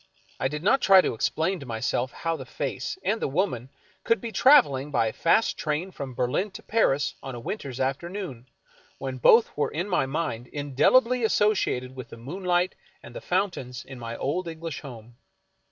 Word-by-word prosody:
I 130 - +1
did 150 +3 -5
not 265 +7 +4
try 190 -1 +7
to - - -1
explain 160 - 0
to 140 - -10
myself 120 +2 -1
how 165 +5 -2
the - - -7
face, - - -4
and 220 +1 0
the - - +1
woman, 135 - -1 0.3
could 230 -1 +2
be 235 - -6
traveling 180 - +5
by 135 -5 +2
a 110 - -2
fast 195 +7 +2
train 155 +5 -2
from 135 -7 -7
Ber 125 0 +1
lin 190 +11 -1
to - - -9
Paris 145 -11 +1
on 135 -2 -6
a - - -6
winter's 135 - -5
afternoon, 135 - -3 0.5
w^hen 130 -2 -5
both 225 - +5
were 150 - 0
in 170 +6 -3
my 175 -9 +1
mind 135 -5 -3
indelibly 190 - +2
associated 195 - +1
with 125 -3 -8
the - - -10
moonlight 180 +7 -1 0.3
and - - -12
the - - -6
foun 185 +2 +1
tains 125 -6 -8
in 135 -2 -10
my 115 0 -6
own 170 +5 -2
English 165 -2 -6
home. 120 -4 -11
150 Hz, 190 wpm, -26 LUFS, 130-190 Hz, 0.5 s, try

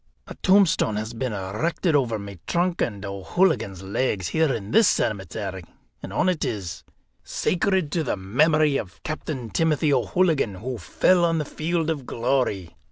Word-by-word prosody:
A - - -8
tombstone 190 - +4
has 110 +2 -4
been 125 +1 -3
erected 110 - -1
over 120 -6 +1
my 100 -3 -9
trunk 175 0 0
and 105 -3 -2
O'Hooligan's 100 - 0
legs, 95 -2 -1
here 160 -3 +2
in 110 -4 -4
this 225 - +6
cemetery, 95 -2 -2 0.4
and - - -7
on - - +1
it 180 -4 +1
is: 95 -6 -4 0.4
'Sacred 185 -3 0
to 165 0 0
the 125 - -2
Memory 150 - +3
of 95 -5 -7
Captain 145 -6 -5
Timothy 155 -2 +2
O'Hooligan, 160 - +1
who 120 +5 -5
fell 180 -1 +2
on 165 -1 +2
the 155 - -1
field 165 +2 -1
of 140 -5 -5
Glory. 115 -7 -1
130 Hz, 160 wpm, -24 LUFS, 100-160 Hz, 0.4 s, this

